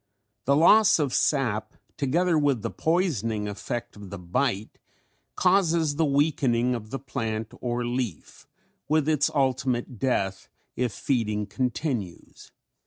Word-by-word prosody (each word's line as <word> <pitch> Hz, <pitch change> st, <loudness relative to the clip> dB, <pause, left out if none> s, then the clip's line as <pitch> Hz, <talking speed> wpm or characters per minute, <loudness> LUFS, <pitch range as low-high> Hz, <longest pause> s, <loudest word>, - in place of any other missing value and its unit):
The 140 Hz, -, +4 dB
loss 205 Hz, +7 st, +6 dB
of 145 Hz, -5 st, -1 dB
sap 120 Hz, -7 st, 0 dB, 0.2 s
together 165 Hz, +6 st, +1 dB
with 145 Hz, -7 st, +1 dB
the -, -, -2 dB
poisoning 120 Hz, -, 0 dB
effect 105 Hz, +4 st, -5 dB
of 100 Hz, -2 st, -10 dB
the 100 Hz, -, -6 dB
bite 100 Hz, +4 st, -2 dB, 0.6 s
causes 170 Hz, -5 st, +2 dB
the 160 Hz, -, +3 dB
weakening 140 Hz, -4 st, +2 dB
of 110 Hz, -3 st, -5 dB
the 135 Hz, -, -3 dB
plant 110 Hz, -4 st, -4 dB
or 120 Hz, 0 st, -2 dB
leaf 120 Hz, -, -4 dB, 0.4 s
with 155 Hz, 0 st, +2 dB
its 155 Hz, -2 st, +2 dB
ultimate 130 Hz, -4 st, -1 dB
death 95 Hz, -8 st, -1 dB, 0.3 s
if 125 Hz, -2 st, -1 dB
feeding 105 Hz, -4 st, -1 dB
continues. 120 Hz, -, -4 dB
125 Hz, 125 wpm, -26 LUFS, 110-150 Hz, 0.6 s, loss